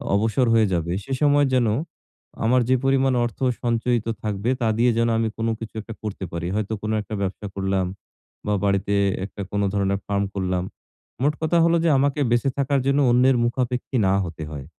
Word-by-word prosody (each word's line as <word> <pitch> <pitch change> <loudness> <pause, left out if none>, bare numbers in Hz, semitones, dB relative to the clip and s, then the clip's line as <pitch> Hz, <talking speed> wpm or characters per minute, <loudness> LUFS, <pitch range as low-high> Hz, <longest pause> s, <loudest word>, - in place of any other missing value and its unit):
অবসর 110 +4 +2
হয়ে 110 -2 +4
যাবে, 85 -1 -1
সে 135 - -5
সময় 145 0 +4
যেন, 125 -2 +3 0.8
আমার 125 +2 +4
যে 130 - +5
পরিমাণ 135 -1 +3
অর্থ 120 - -6 0.2
সঞ্চয়িত 120 -1 0 0.2
থাকবে, 105 +2 -2
তা 115 - +2
দিয়ে 120 +1 +4
যেন 115 0 +2
আমি 115 0 +1
কোন 115 - -1
কিছু 115 -1 -8
১ 105 - -8
টা 115 - -4
করতে 100 -2 -4
পারি। 85 0 -4
হয়তো 110 0 -2
কোনো 110 0 -2
১ 105 - -6
টা 110 - -3
ব্যবসা 100 +2 -3
করলাম 95 -1 0 0.6
বা 105 - +1
বাড়িতে 100 0 +1 0.3
১ 100 - -5
টা - - -3
কোন 100 - 0
ধরনের 100 -1 0
ফার্ম 100 0 0
করলাম। 95 -2 -1 0.6
মোট 150 +2 +3
কথা 160 +2 +2
হলো 170 0 +3
যে, - - +4
আমাকে 140 +2 +1
বেঁচে 120 +3 +2
থাকার 140 0 +1
জন্য 140 +1 +3
অন্যের 125 +1 +4
মুখাপেক্ষী 125 +1 -1
না 95 - +3
হতে 80 -2 -7
হয়। 70 -3 -7
115 Hz, 200 wpm, -23 LUFS, 100-130 Hz, 0.8 s, যে